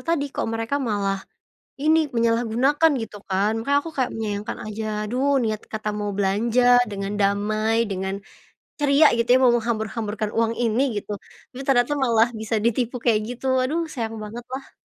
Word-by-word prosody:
tadi. 330 -4 0
Kok - - -2
mereka 225 +4 -2
malah, 200 -5 -1 0.6
ini, 315 +2 +4 0.2
menyalahgunakan 235 +7 +2
gitu 215 -2 -7
kan. 195 +3 +2
Makanya 280 +5 +2
aku 325 +2 -7
kayak 255 - 0
menyayangkan 210 -1 -4
aja, 215 +1 -5 0.2
aduh, 265 +4 +1
niat 215 -1 -2
kata 215 -1 -2
mau 205 0 -2
belanja, 220 +5 +1 0.3
dengan 195 0 -4
damai, 215 +3 +1
dengan 190 0 -2 0.7
ceria 290 +2 +5
gitu 235 0 0
ya, 255 - +7
mau 250 -2 +5
menghambur-hamburkan 220 -2 -2
uang 230 0 +2
ini 230 +3 +2 0.2
gitu, 210 - -8 0.4
tapi 265 0 -10
ternyata 265 0 +2
malah 230 -2 +4
bisa 220 0 -1
ditipu 240 +1 0
kayak 225 -3 +3
gitu. 245 +2 -6 0.2
Aduh 310 +6 0
sayang 225 -6 -4
banget 225 +3 -7
lah. 270 +1 -7
230 Hz, 160 wpm, -23 LUFS, 215-255 Hz, 0.7 s, ya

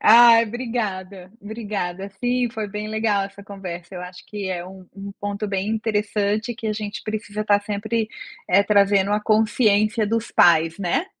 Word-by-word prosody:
Ai 230 0 +8
obrigada, 205 -6 -4
obrigada, 200 -3 -5
sim 245 0 +1
foi 220 -2 -4
bem 210 +1 -5
legal 215 -2 +1
essa 200 0 -10
conversa, 185 -3 -8
eu 180 - -6
acho 180 0 -10
que 205 -2 -5
é 175 -2 -3
um 185 -1 -12
um 200 0 -7
ponto 205 +1 -3
bem 195 +1 -2
interessante 215 0 -1
que 225 - -6
a 215 - 0
gente 210 -1 -5
precisa 215 -1 -4
estar 205 -1 +3
sempre, 215 +2 -2 0.4
eh, 195 +3 +5
trazendo 200 -1 +3
a 210 - +2
consciência 215 0 +2
dos 230 +1 -1
pais, 165 0 +4
né. 200 - 0
205 Hz, 165 wpm, -22 LUFS, 195-220 Hz, 0.4 s, Ai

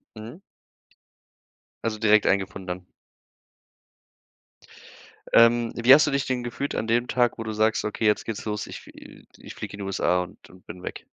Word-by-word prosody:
Mhm. 115 - -10 1.4
Also 110 -2 -2
direkt 105 -1 +4
einen 100 - +4
gefunden 95 0 -8
dann? 90 0 -5 2.5
Ähm, 115 0 +5
wie 120 +3 +7
hast 155 +2 +5
du - - 0
dich 140 -1 -1
denn 130 -2 -2
gefühlt 120 +4 -4
an - - -2
dem 120 +2 +1
Tag, 120 -2 +1
wo 115 - -5
du 110 - -4
sagst: 110 +1 +1
„Okay, 105 +1 -2
jetzt 105 - +2
geht's 110 -3 -5
los, 105 -1 -3
ich - - -8
f - - -14 0.5
ich - - -11
flieg - - -7
in 100 - -9
die 100 - -5
USA 90 -2 0
und, 90 - -15
ähm, 90 0 -17
bin 90 +2 -11
weg?” - - -8
110 Hz, 180 wpm, -25 LUFS, 100-120 Hz, 2.5 s, wie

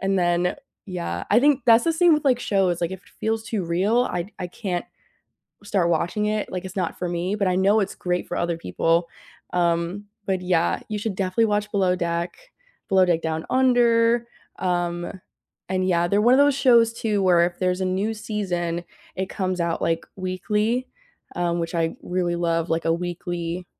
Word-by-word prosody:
and 195 0 +1
then, 175 +2 +1 0.3
yeah. 170 - -4
I 220 - +6
think 285 0 +4
that's 230 +4 +6
the 330 - +2
same 345 +1 +4
with 300 - -2
like 255 -3 +3
shows, 190 -6 +1
like 170 - -1
if 190 -1 -7
it - - -22
feels 220 0 -1
too 220 -3 -2
real, 195 +8 +2
I 180 -2 -3
I 180 - -2
can't 180 -1 -3 0.8
start 190 -4 +1
watching 175 +6 0
it, 215 0 -1
like, 185 0 -4
it's 190 +2 -8
not 180 -3 -2
for 180 - -2
me, 175 +3 -2
but 200 -3 +1
I 180 - +1
know 200 +3 +4
it's 195 - -2
great 180 0 -2
for 175 - -3
other 170 -1 -1
people, 170 0 0 0.4
um, 170 +2 0 0.2
but 190 -1 0
yeah, 95 - +1
you 215 - -3
should 205 -1 -3
definitely 195 +4 +1
watch 210 0 -1
Below 190 -3 +2
Deck, 170 0 -2 0.5
Below 190 -2 +5
Deck 170 -2 +1
Down 160 0 -2
Under, 235 -2 +3 0.3
um, 175 -1 -1 0.6
and 185 0 0
yeah, 170 -1 +2
they're 200 +2 +2
one 240 +4 +5
of 265 - +4
those 285 0 +5
shows 235 -4 +5
too 215 -3 -1
where 175 -2 +5
if 175 0 -6
there's 180 0 0
a - - 0
new 190 +4 0
season, 175 -6 -3 0.3
it 190 0 -2
comes 185 -2 -2
out, 170 -1 -1
like, 165 0 0
weekly, 210 +6 -1 0.5
um, 175 -1 0
which 165 +1 -4
I 165 -1 0
really 180 -1 -1
love 165 -1 0
like 165 0 0
a 165 - +3
weekly 175 0 -4
185 Hz, 195 wpm, -23 LUFS, 175-210 Hz, 0.8 s, I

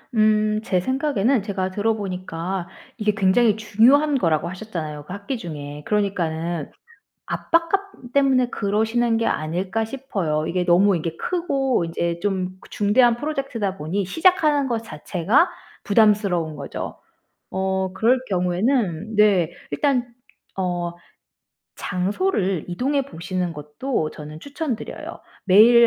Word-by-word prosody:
음 215 0 +3
제 185 -4 +1
생각에는 260 +1 +1
제가 190 -3 -2
들어보니까 185 -4 -2 0.3
이게 210 -2 +1
굉장히 210 +2 +4
중요한 260 +8 +4
거라고 165 - +1
하셨잖아요 165 -7 -6
그 180 - -7
학기 200 +6 -4
중에. 150 -5 -7
그러니까는 170 -6 -1 0.5
압박감 335 -3 -1
때문에 265 -3 +3
그러시는 225 +3 +1
게 230 - 0
아닐까 185 +8 -1
싶어요. 195 - -2
이게 180 0 0
너무 180 +2 +4
이게 165 0 -4
크고 275 - 0
인제 170 +1 -2
좀 185 -2 -2
중대한 230 +4 +4
프로젝트다 245 -8 -3
보니 180 +7 -2
시작하는 305 - +3
것 235 -3 0
자체가 210 - +1 0.3
부담스러운 200 -7 +3
거죠. 140 -1 -6 0.5
어 190 0 -1
그럴 240 +6 +3
경우에는 190 - 0
네. 195 -6 +4 0.2
일단 255 -4 0 0.4
어 175 -2 -1 0.8
장소를 190 - -1
이동해 275 +10 0
보시는 180 -7 -4
것도 155 - -3
저는 150 0 -9
추천 285 - -3
드려요. - - -8 0.3
매일 210 +5 +7
205 Hz, 285 characters per minute, -23 LUFS, 175-245 Hz, 0.8 s, 매일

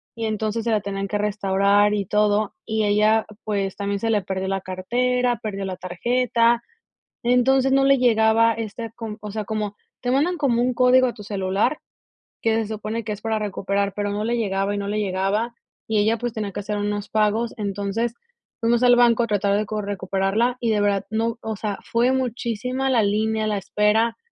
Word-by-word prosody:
y 230 -1 -3
entonces 220 +1 -2
se 235 - -1
la 215 -1 +2
tenían 195 0 -3
que 205 - -1
restaurar 205 0 +2
y 205 -1 -1
todo. 210 +1 +1
Y 220 -1 0
ella, 215 +2 +3 0.2
pues, 200 -2 -2
también 200 0 -2
se 225 +1 0
le 210 - +2
perdió 190 0 -3
la 195 0 -1
cartera, 245 +6 0
perdió 200 -2 -4
la 190 -1 -4
tarjeta. 235 +6 +1 0.6
Entonces 255 +2 +3
no 270 0 +4
le 275 0 +5
llegaba 230 -1 +4
esta 225 0 -5
con 225 -1 -7
o 210 - -6
sea 215 +1 -4
como 210 -1 -3 0.3
te 245 - -1
mandan 305 +8 +2
como 265 -6 +1
un 250 0 +1
código 255 +1 +5
a 245 - -3
tu 215 - -10
celular 200 +7 0 0.6
que 225 -1 +2
se 225 -1 0
supone 215 +1 -4
que 210 - -3
es 210 - -6
para 220 0 -1
recuperar, 200 -1 -1
pero 205 0 -2
no 205 +1 -2
le 235 +1 0
llegaba 195 -2 0
y - - -2
no 200 0 -3
le 210 +1 -1
llegaba. 200 +4 -1 0.3
Y 220 -1 0
ella, 215 +2 +3
pues, 240 +1 -3
tenía 210 -3 -4
que - - -4
hacer 210 +1 -3
unos 205 0 -2
pagos. 220 +2 +1
Entonces 205 +3 -2 0.5
fuimos 235 +1 +2
al 245 0 +6
banco 240 -1 +4
a - - -2
tratar 205 -2 +1
de 210 - -1
cor 210 0 -3
recuperarla, 200 +4 0
y 235 - 0
de 210 -1 +2
verdad, 205 -1 +1
no, 225 +1 -1
o 220 -1 -4
sea, 205 -1 -3
fue 240 +3 +2
muchísima 250 0 -2
la 240 -4 +3
línea, 215 +1 0
la 210 -1 0
espera, 210 +4 +1
215 Hz, 200 wpm, -23 LUFS, 205-235 Hz, 0.6 s, al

